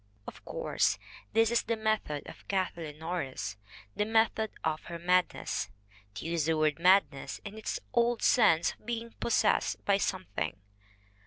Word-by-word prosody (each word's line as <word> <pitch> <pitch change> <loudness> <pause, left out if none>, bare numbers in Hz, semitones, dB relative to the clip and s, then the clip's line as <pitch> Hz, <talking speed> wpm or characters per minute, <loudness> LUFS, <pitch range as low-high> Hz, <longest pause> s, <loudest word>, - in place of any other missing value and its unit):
Of - - -10
course, - - +1 0.4
this 225 +1 +4
is 235 - +3
the 230 - -1
method 215 -9 -1
of - - -12
Kathleen 170 -6 -2
Norris, 160 -9 -3 0.4
the - - +1
method 220 0 +2 0.2
in 155 -1 +1
her 170 - -6
madness, 180 +1 +1 0.5
to - - -6
use 165 -2 0
the 160 0 +2
word 155 0 +2
madness 180 -6 +3
in 200 +1 -7
its 220 - -3
old 235 0 +2
sense 170 -9 +5
of - - -25
being 230 -1 -3
possessed 235 - +1
by 200 -1 +4
something. 180 - -2
185 Hz, 150 wpm, -30 LUFS, 160-220 Hz, 0.5 s, sense